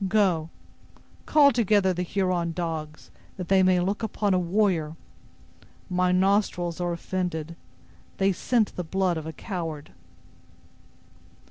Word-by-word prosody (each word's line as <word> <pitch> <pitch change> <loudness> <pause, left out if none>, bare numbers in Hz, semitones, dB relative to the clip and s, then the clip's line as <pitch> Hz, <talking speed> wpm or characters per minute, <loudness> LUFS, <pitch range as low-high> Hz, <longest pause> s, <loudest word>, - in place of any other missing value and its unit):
Go! 185 -6 +2 0.8
call 290 -2 +6
together 210 -5 +2
the 180 - -3
Huron 180 -2 -1
dogs, 160 -3 -5 0.3
that 180 -2 -6
they 190 -1 +5
may 185 -1 +4
look 195 +5 -1
upon 210 -2 0
a 185 - +3
warrior, 175 -4 0 1.0
My 180 0 +2
nostrils 185 -2 +1
are 175 0 -1
offended; 170 -2 -3 0.6
they 195 0 +3
scent 220 +4 0
the 180 - -3
blood 185 +1 0
of 160 0 -6
a 160 - -6
coward." 165 -5 -6
180 Hz, 125 wpm, -26 LUFS, 170-195 Hz, 1.0 s, call